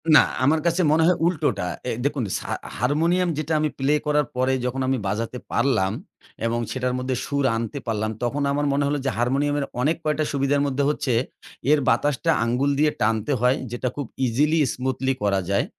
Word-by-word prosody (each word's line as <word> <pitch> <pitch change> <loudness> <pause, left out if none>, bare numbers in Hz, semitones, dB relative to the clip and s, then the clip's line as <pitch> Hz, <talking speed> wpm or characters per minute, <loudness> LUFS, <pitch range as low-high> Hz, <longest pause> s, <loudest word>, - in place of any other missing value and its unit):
না, - - +10 0.2
আমার 155 +4 +4
কাছে 170 +2 +2
মনে 160 +1 +4
হয় 180 - +3
উল্টোটা। 145 - 0 0.2
এ - - 0
দেখুন 140 -3 0 0.2
সা - - -8 0.3
হারমোনিয়াম 170 +7 +2
যেটা 155 +1 -2
আমি 155 - +1
প্লে 140 +3 +2
করার 150 0 +2
পরে, 130 +1 +1
যখন 130 +2 -2
আমি 135 - +1
বাজাতে 115 +5 -2
পারলাম 120 -7 +2 0.5
এবং 120 +1 0
সেটার 125 -1 -1
মধ্যে 130 0 -2
সুর 140 -1 -1
আনতে 115 +4 -3
পারলাম, 110 -1 -1
তখন 135 +4 -1
আমার 145 +1 0
মনে 145 - +1
হলো 145 - 0
যে, 135 - +2
হারমোনিয়ামের 140 +4 +1 0.2
অনেক 155 +5 +2
কয়েকটা 155 0 0
সুবিধার 140 +1 +1
মধ্যে 140 +1 0
হচ্ছে, 145 -4 -1 0.6
এর 150 - +5
বাতাসটা 145 +7 +2
আঙ্গুল 125 +5 +1
দিয়ে 150 0 +4
টানতে 110 +5 +1
হয় 125 +2 +3
যেটা 120 +1 -2
খুব 145 - -3 0.2
ইজিলি, 150 +7 +2
স্মুথলি 130 +1 -1
করা 100 -1 +2
যায়। 100 - +2
140 Hz, 180 wpm, -23 LUFS, 125-150 Hz, 0.6 s, না